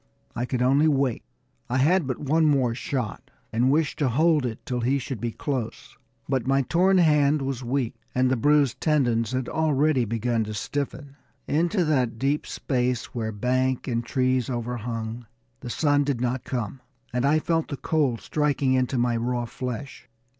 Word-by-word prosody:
I 120 +1 -1
could 125 -1 -1
only 140 +5 +4
wait. 135 -5 +1 0.5
I 125 - 0
had 160 +4 +3
but 130 - -2
one 155 +3 +1
more 135 -6 +3
shot, 125 -2 -4 0.2
and 120 +3 +3
wished 150 +1 +1
to 140 -4 +2
hold 150 +1 +3
it 115 -1 -7
till 125 -1 -2
he 130 +4 +2
should 130 -4 -5
be 120 -1 -1
close; 130 -2 -4 0.3
but 130 -3 -1
my 135 0 +3
torn 185 +7 +3
hand 150 -4 +4
was 135 -2 -3
weak, 125 0 -1 0.2
and 130 0 +3
the - - +3
bruised 140 -1 +2
tendons 120 -7 +2
had 130 -1 -2
already 150 -4 +2
begun 115 +1 0
to 105 0 -5
stiffen. 140 +4 -4 0.3
Into 175 +4 +1
that 130 -7 +1
deep 140 +5 0 0.2
place, 125 -2 0
where 110 -3 -2
bank 130 +4 0
and 120 -2 -1
trees 130 0 0
overhung, 120 -1 -4 0.3
the 125 - -7
sun 145 +2 +2
did 140 -4 -1
not 125 0 -2
come, 125 0 -4 0.3
and 125 0 0
I 145 +3 +4
felt 165 +1 0
the 140 - -5
cold 140 -8 0
striking 145 -3 +1
into 130 0 +1
my 120 0 +1
raw 120 +1 -1
flesh. 125 +1 -6
130 Hz, 175 wpm, -25 LUFS, 120-145 Hz, 0.5 s, only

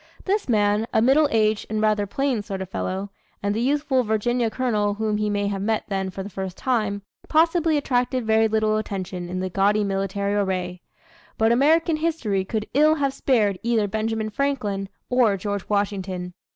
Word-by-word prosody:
This 400 -5 0
man, 210 0 +2
a - - +3
middle 270 +6 +4
aged 215 -2 +1
and 215 0 -1
rather 215 -1 +1
plain 265 +1 -1
sort 200 -2 -5
of 190 -1 -6
fellow 190 +2 -3 0.3
and 205 0 +1
the 220 - -1
youthful 280 0 +1
Virginia 230 +1 0
colonel 215 -4 0
whom 215 0 -1
he 210 0 0
may 205 0 0
have 200 -1 -2
met 220 +2 0
then 195 -1 -1
for 190 +1 -6
the 200 - -7
first 190 -1 -5
time 210 -6 -1 0.3
possibly 325 0 +3
attracted 250 -2 0
very 220 0 +4
little 215 0 +1
attention 185 -4 -4
in 185 +1 -3
the 185 - -2
gaudy 205 +3 +2
military 200 0 -1
array. 185 -3 -1 0.6
But 225 +1 +3
American 315 +6 +3
history 305 -12 -1
could 215 +2 -3
ill 305 +3 +5
have 280 -3 0
spared 210 -10 +1
either 225 -3 +1
Benjamin 220 +1 -2
Franklin 210 -7 -2 0.2
or 240 -5 +3
George 200 0 -4
Washington. 190 -3 -2
215 Hz, 180 wpm, -23 LUFS, 200-250 Hz, 0.6 s, ill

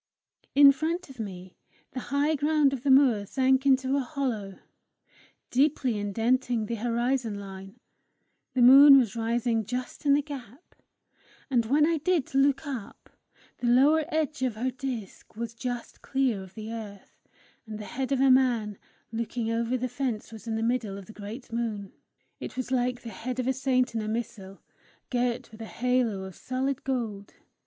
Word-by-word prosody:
In 280 0 +9
front 320 +3 -3
of 255 - -16
me, 185 -4 -7 0.4
the 255 - -5
high 285 +3 +2
ground 295 -1 +2
of 265 - -4
the 280 - -1
moor 260 -6 +5
sank 265 +2 +2
into 265 0 +3
a - - +2
hollow, 245 -8 -3 0.9
deeply 260 -4 +1
indenting 225 +3 0
the 235 - -4
horizon 240 0 -1
line: 195 +2 -10 0.8
the 250 - +4
moon 275 +3 +10
was 235 -4 +1
rising 230 0 0
just 250 +6 -5
in 280 - +6
the 290 - +1
gap, 275 - -10 0.8
and 235 -3 +2
when 295 +5 +4
I 325 0 +1
did 330 -4 0
look 275 +2 +2
up, 260 -8 -7 0.5
the 245 - -1
lower 285 +6 +5
edge 310 -2 -2
of 255 -4 0
her 250 +4 -1
disc 250 -8 -7
was 230 0 -5
just 245 0 -6
clear 260 -7 0
of 190 0 -13
the 220 0 -7
earth, 210 -4 -9 0.5
and 215 -1 -6
the 210 - -7
head 265 +4 -4
of 270 - +1
a 270 -1 +5
man 240 -6 +2 0.3
looking 230 0 -3
over 235 +2 0
the 255 +1 -2
fence 245 -3 -3
was 225 0 -11
in 225 - -1
the 225 - -1
middle 230 -4 -1
of 200 - -10
the 220 - -13
great 215 +5 -9
moon. 215 -4 -3 0.5
It - - -7
was 255 0 -4
like 250 -1 0
the 235 - -6
head 250 +3 -5
of 255 - -1
a 265 - +1
saint 255 -2 +1
in 225 - -1
a 215 - -4
missal, 215 -4 -5 0.5
girt 245 0 -1
with 220 +1 -12
a - - -5
halo 245 -6 0
of 190 -1 -9
solid 265 +1 -3
gold. 225 -7 -4
245 Hz, 175 wpm, -27 LUFS, 220-270 Hz, 0.9 s, moon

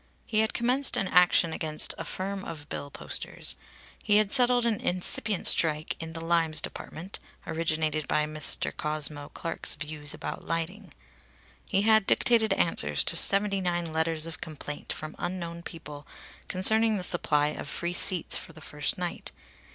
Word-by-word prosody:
He 215 - 0
had 220 0 0
commenced 250 +3 +2
an 195 - +1
action 180 -2 +4
against 155 -1 +1
a - - -6
firm 195 +1 -5
of 150 -5 -9
bill 145 - -6
posters. - - 0 0.5
He 210 -1 +3
had 210 -1 +2
settled 245 -2 +4
an 225 -3 -1
incipient 185 +2 +1
strike 155 -1 +5
in 160 0 -7
the 165 0 -6
"limes" 165 -2 +2
department, 180 +5 -7 0.3
originated 155 -2 -2
by 150 0 +1
Mr. 155 0 -1
Cosmo 150 -1 -1
Clark's 165 -2 -2
views 150 -1 -4
about - - -7
lighting. 165 +6 -4 0.8
He 195 +1 0
had 220 -2 +4
dictated 225 -2 +3
answers 75 - +1
to - - +3
seventy 200 0 +5
nine 175 -2 -2
letters 160 0 0
of 165 -3 -9
complaint 145 -1 -6
from 155 0 -7
unknown 170 -1 -5
people 150 -4 -10 0.4
concerning 220 +3 +3
the 185 - -4
supply 150 -4 +1
of 145 - -7
free 175 +3 -3
seats 175 -1 +1
for 165 - -12
the 160 - -14
first 150 -1 -4
night. 175 -1 -5
165 Hz, 160 wpm, -27 LUFS, 155-195 Hz, 0.8 s, strike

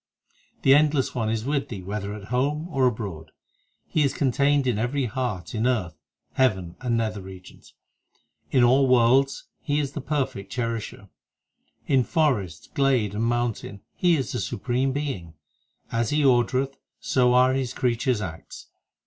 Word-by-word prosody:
2 - - -40 0.3
The 135 - +7
Endless 145 -2 +3
One 115 -3 -1
is 110 0 -2
with 140 0 -1
thee 100 -5 -6
whether 100 +1 -4
at 100 -1 -10
home 145 +6 0
or 135 -5 +2
abroad; 100 -10 -4 0.6
He 155 - 0
is 140 -2 +1
contained 140 +1 +2
in 120 -5 0
every 130 +4 0
heart, 110 -8 -3
In 110 +2 0
earth, 105 -10 0 0.4
heaven, 95 -10 +1
and 120 -3 0
nether 110 -3 -2
regions; 95 -1 -13 0.7
In 130 - +3
all 130 +3 +5
worlds 130 +2 +3 0.2
He 145 -1 -1
is 140 -2 -2
the 145 - -5
Perfect 130 -9 -3
Cherisher; 115 -4 -4 0.8
In 135 -3 +3
forest, 120 - -1
glade, 130 -7 +2
and 110 +2 -1
mountain 120 -4 -2
He 175 -2 +3
is 135 - -3
the 125 - -2
Supreme 125 +7 -1
Being; 130 - -4 0.6
As 115 -1 0
He 150 0 +1
ordereth 130 +1 +2 0.2
so 125 -1 +2
are 130 +1 +5
His 130 -2 -1
creatures 125 -2 0
acts. 85 -5 -8
125 Hz, 155 wpm, -25 LUFS, 105-135 Hz, 0.8 s, The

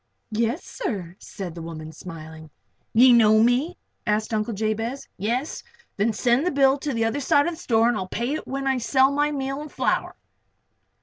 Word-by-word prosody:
"Yes, 230 +7 -1
sir," 185 - -5
said 190 -5 -7
the 170 - -8
woman, 160 -1 -7
smiling. 160 -2 -10 0.4
"You 245 +2 +7
know 220 -2 +6
me?" 255 +9 +1 0.3
asked 215 +1 0
Uncle 215 +1 -1
Jabez. 225 +5 -2
"Yes? 240 - -2 0.3
Then 210 +3 +1
send 240 +4 +2
the 360 - +1
bill 275 -2 +3
to 295 +1 -3
the 230 -3 0
other 225 +5 -1
side 285 +1 +3
of 345 - 0
the - - -10
store 230 -7 +2
and 240 - +2
I'll 190 -3 -3
pay 240 +8 -2
it 310 - -5
when 275 +1 -3
I 265 -1 +1
sell 265 +3 +3
my 295 +1 +1
meal 275 0 -3
and 300 - -9
flour." - - -1
235 Hz, 190 wpm, -24 LUFS, 210-275 Hz, 0.4 s, You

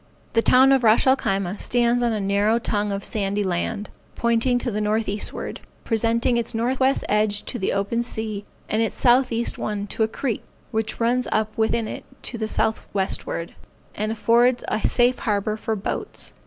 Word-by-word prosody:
The 230 - +4
town 260 +3 +6
of 265 -2 +3
Ras 220 0 +5
el 260 0 +6
Khyma 195 -4 -2
stands 240 0 +2
on 240 -1 +2
a 215 - -1
narrow 200 +3 +2
tongue 210 -3 -1
of 200 0 -3
sandy 205 -1 -1
land, 190 +3 -2 0.2
pointing 235 +2 +2
to 245 0 -2
the 210 0 -2
northeastward, 210 -1 -2 0.2
presenting 230 +1 +1
its 235 0 -1
northwest 260 +4 +1
edge 210 -1 +1
to 245 - -5
the 190 - 0
open 200 +4 0
sea, 220 -3 -2 0.2
and 220 - 0
its 225 - -1
southeast 240 -2 +2
one 205 -1 -2
to 205 - -5
a 220 - +4
creek, 230 0 -3 0.3
which 220 -1 -2
runs 240 +2 +1
up 215 0 0
within 220 0 +1
it - - -6 0.2
to 235 - -3
the 220 - -1
southwestward, 195 -6 -2 0.4
and 215 +1 -2
affords 235 +3 +3
a 215 - -1
safe 245 +1 +2
harbor 210 -2 0
for 220 0 -2
boats. 200 - -4
220 Hz, 175 wpm, -23 LUFS, 210-235 Hz, 0.4 s, town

